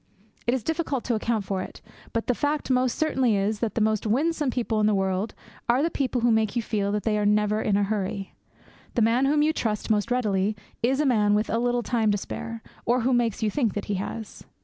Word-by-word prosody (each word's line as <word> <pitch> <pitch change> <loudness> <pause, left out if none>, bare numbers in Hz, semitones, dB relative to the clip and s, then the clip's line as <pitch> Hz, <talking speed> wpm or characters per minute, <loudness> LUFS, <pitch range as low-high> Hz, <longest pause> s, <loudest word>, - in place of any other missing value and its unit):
It 240 - +3
is 255 - -3
difficult 320 -3 -1
to 245 - -1
account 220 -1 0
for 190 -1 -2
it; - - -8 0.3
but 230 - -1
the 250 - +2
fact 290 +1 -1
most 255 -1 +2
certainly 265 -8 +2
is 205 +2 0
that 225 -2 -2
the 230 - +1
most 215 0 +1
winsome 295 +5 +1
people 235 -3 -1
in 210 - +3
the 215 - +3
world 190 +2 -1 0.3
are 250 +4 +4
the 330 - +1
people 260 -4 -1
who 240 0 +4
make 220 -1 +1
you 240 - +1
feel 205 -2 -1
that 210 - -1
they 210 -2 +1
are - - 0
never 210 +1 +2
in 200 -2 +2
a 205 - +2
hurry. 195 -1 -2 0.6
The 235 - +3
man 235 +4 +3
whom 295 +2 +3
you 310 +1 +2
trust 215 -6 -1
most 210 +1 +1
readily 210 -4 +1 0.3
is 260 +3 +2
the 300 - +1
man 210 -5 +3
with 215 +1 0
a 230 - +1
little 245 0 +1
time 225 -3 +1
to 205 - +2
spare, 225 +3 -6 0.2
or 245 +2 +2
who 255 +3 +2
makes 235 -3 +1
you 215 - +1
think 235 -6 0
that 205 - -3
he 205 - -2
has. 220 +1 -7
225 Hz, 240 wpm, -26 LUFS, 210-250 Hz, 0.6 s, are